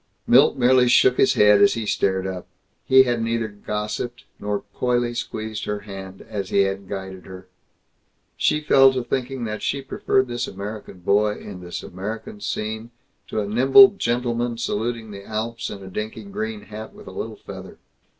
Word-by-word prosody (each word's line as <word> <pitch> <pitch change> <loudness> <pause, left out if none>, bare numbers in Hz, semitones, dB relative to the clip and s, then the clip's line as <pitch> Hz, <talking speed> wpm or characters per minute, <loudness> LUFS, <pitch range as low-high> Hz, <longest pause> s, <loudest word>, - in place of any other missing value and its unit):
Milt 135 +3 +5
merely 125 0 +5
shook 125 +1 +5
his - - +4
head 105 0 +6
as 200 -1 +5
he 115 - -3
stared 95 -2 0
up. 95 -1 -5 0.4
He 130 0 +7
had 120 -2 -1
neither 115 0 -1
gossiped 105 +3 -5 0.2
nor 105 0 -2
coyly 120 -1 0
squeezed 110 -2 -4
her 105 0 -3
hand 95 -2 -9
as 100 -3 -4
he 100 - +3
had 95 0 -2
guided 95 -2 -6
her. 95 0 -11 0.9
She 150 - +1
fell 135 -3 +6
to 130 -1 -2
thinking 130 +1 -3
that 110 -1 -4
she 140 -1 -2
preferred 130 0 +1
this 120 0 -3
American 100 -1 -8
boy 105 +3 +2
in 95 -3 -9
this 90 -1 -6
American 105 +4 -6
scene 110 +2 -4 0.4
to 110 - -2
a 100 - -3
nimble 135 - +8
gentleman 120 - -1
saluting 115 0 -3
the 100 -1 -9
Alps 115 +3 -4
in 100 -1 -8
a - - -9
dinky 105 +3 -5
green 215 +2 -5
hat 110 - -9
with - - -13
a - - -9
little - - -5
feather. - - -10
110 Hz, 175 wpm, -23 LUFS, 100-120 Hz, 0.9 s, nimble